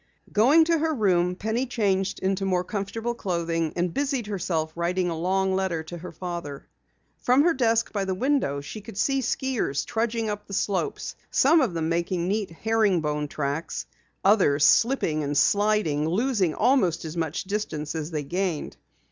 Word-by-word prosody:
Going 270 +10 +6
to 335 -1 +2
her 315 0 0
room, 180 -5 +2
Penny 220 +7 -2
changed 195 -5 0
into 195 +1 0
more 185 -2 +1
comfortable 220 +5 -3
clothing 170 -6 -2
and 175 -1 -1
busied 275 -4 -1
herself 170 -6 -2
writing 175 +1 0
a - - -2
long 190 +3 0
letter 185 -4 -1
to 175 +2 -8
her 180 - -8
father. 170 -5 -6 0.5
From 255 +3 +4
her 340 +1 +4
desk 230 -4 +1
by 200 -2 -1
the 190 -1 -1
window 250 - 0
she 140 +10 -8
could 215 -1 -11
see 270 +5 +1
skiers 245 - -1
trudging 225 0 -1
up 210 -1 -4
the 200 - -4
slopes, 205 - -2
some 315 +4 +4
of 220 -10 0
them 160 -1 -1
making 170 +1 -1
neat 205 +1 -1
herring 210 0 +1
bone 150 -1 -2
tracks, 145 +2 -3 0.4
others 185 -8 +4
slipping 225 - +3
and 145 0 -1
sliding, 200 -8 +2
losing 200 - +1
almost 210 - +2
as 160 +1 -6
much 160 -2 -2
distance 185 -7 -3
as 160 -1 -4
they 155 -3 -3
gained. 175 +1 -3
190 Hz, 170 wpm, -25 LUFS, 165-225 Hz, 0.5 s, Going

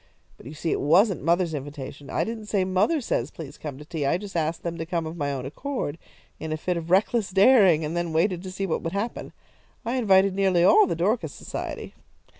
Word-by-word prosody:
But - - -14
you 150 - -9
see 160 +2 -2
it - - 0
wasn't 185 +7 +3
mother's 170 0 +1
invitation. 140 -1 -7
I - - 0
didn't 220 -2 -6
say 200 -3 +1
'mother 195 - +1
says 135 - -1
please 150 -3 -10
come 145 -4 -6
to 150 - -11
tea,' 160 -2 -4
I 140 +5 +2
just 200 -1 -9
asked 160 0 -1
them 170 -1 -3
to 165 - -3
come 170 -2 -2
of 160 +1 -6
my 145 -4 -2
own 130 -2 -4
accord, 165 - -4 0.4
in 160 0 -5
a 155 - -1
fit 180 +3 -2
of 170 0 -5
reckless 200 +3 +2
daring, 190 -5 +5
and 155 +3 -4
then 175 -1 -1
waited 170 +2 +1
to 185 0 -7
see 195 +1 -3
what 170 - -1
would 165 - -4
happen. 205 +4 -4 0.5
I 240 +3 -1
invited 195 -4 +4
nearly 190 -3 +2
all 420 - +6
the - - -1
Dorcas 175 - 0
Society." - - -6
175 Hz, 230 wpm, -25 LUFS, 155-195 Hz, 0.5 s, all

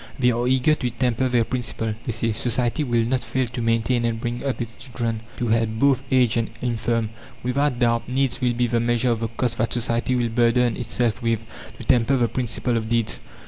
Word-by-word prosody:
They 125 -2 +3
are 120 +1 0
eager 130 +4 +3
to 125 -5 -1
temper 125 +1 0
their 120 -2 +3
principle. 115 -2 -2
They - - -1
say: 115 0 0
"Society 120 +5 0
will 120 -4 +1
not 130 +2 0
fail 130 -1 -1
to 120 0 -5
maintain 115 +1 +1
and 115 -1 -1
bring 120 +1 -3
up 135 -2 -2
its 115 -2 -4
children; 120 -4 -4 0.2
to 120 - -1
help 115 0 +2
both 135 +1 +3
aged 125 -3 +3
and 115 -1 0
infirm. 115 -2 -1 0.3
Without 130 +1 +1
doubt 115 -1 +1
needs 135 +1 0
will 125 -1 +2
be 120 +1 +1
the 120 0 +1
measure 120 +1 +2
of 115 - 0
the 115 - -1
cost 115 +1 -2
that 115 0 +1
society 120 +1 0
will 120 -1 +1
burden 120 0 +2
itself 120 -1 -1
with, 115 -2 0 0.4
to 120 - -9
temper 125 +3 +3
the 120 -2 +2
principle 120 0 -1
of 110 -1 -3
deeds." 115 -2 0
120 Hz, 215 wpm, -23 LUFS, 115-125 Hz, 0.4 s, They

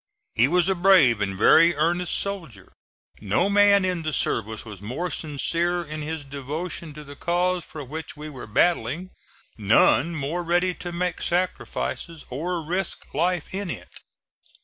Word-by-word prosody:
He 120 +3 +4
was 175 +3 +2
a 190 - +3
brave 175 - +5
and 95 -2 -2
very 165 - +6
earnest 170 +3 0
soldier. 165 - -6 0.5
No 110 - +1
man 200 -1 +5
in 180 -2 -1
the 155 -1 -2
service 110 -4 -1
was 105 -4 -10
more 140 +12 -4
sincere 170 +4 -1
in 155 -1 -6
his 155 0 -4
devotion 150 +4 -5
to 150 - -9
the 145 0 -11
cause 175 +2 0
for 150 -2 -8
which 155 +3 -7
we 150 +1 -7
were 135 -6 -9
battling; 165 - +1 0.5
none 120 +10 +4
more 155 +4 -2
ready 175 +2 +1
to 175 0 -7
make 175 0 -2
sacrifices 175 -2 -2
or 165 +6 -3
risk 185 +4 -3
life 175 +2 0
in 195 -1 -3
it. - - -7
165 Hz, 155 wpm, -24 LUFS, 140-180 Hz, 0.5 s, very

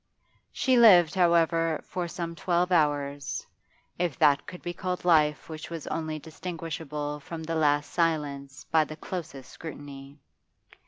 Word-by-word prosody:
She 260 -2 +2
lived, 180 -8 +7
however, 165 -3 +3
for 180 -1 -3
some 170 0 -5
twelve 175 +1 0
hours, 145 -4 0 0.5
if 175 -7 -1
that 145 -1 +3
could 180 - -9
be 175 - -3
called 180 0 -4
life 150 -4 +3
which 155 -1 -8
was 165 -3 -6
only 155 -1 -3
distinguishable 155 -2 -5
from 160 +3 -7
the 165 +1 -3
last 145 -2 +1
silence 145 -4 -1
by 160 -1 +5
the 155 0 -8
closest 155 -7 -7
scrutiny. 140 -3 -9
160 Hz, 140 wpm, -27 LUFS, 145-170 Hz, 0.5 s, lived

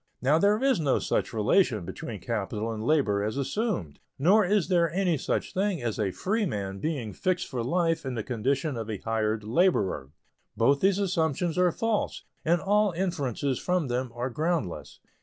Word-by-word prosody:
Now 145 +5 +3
there 205 +3 +4
is 270 -8 +3
no 145 -4 +2
such - - -1
relation 110 - +2
between 95 +2 -7
capital 110 0 -2
and 110 -1 -5
labor 115 -8 +2
as 110 +5 -2
assumed, 140 - -2 0.2
nor 195 +9 +5
is 200 -1 +2
there 170 -3 +2
any 180 -1 +1
such 135 - -2
thing 195 -2 0
as 115 -1 -2
a 105 -2 +1
free 205 - -1
man 100 - -4
being 130 -9 -3
fixed 185 - -1
for 125 -3 -3
life 165 +5 +1
in 130 -2 -4
the 110 - -2
condition 130 +5 -1
of 110 -1 -5
a 105 - -2
hired 110 +1 -1
laborer. 105 - +1 0.5
Both 140 +5 +4
these 195 0 +3
assumptions 170 -4 0
are 180 -1 +4
false, 225 +3 -1 0.2
and 170 +2 +3
all 205 +1 +2
inferences 145 - -1
from 180 -6 0
them 125 0 -2
are 125 +2 -3
groundless. 155 - -2
140 Hz, 175 wpm, -27 LUFS, 110-180 Hz, 0.5 s, nor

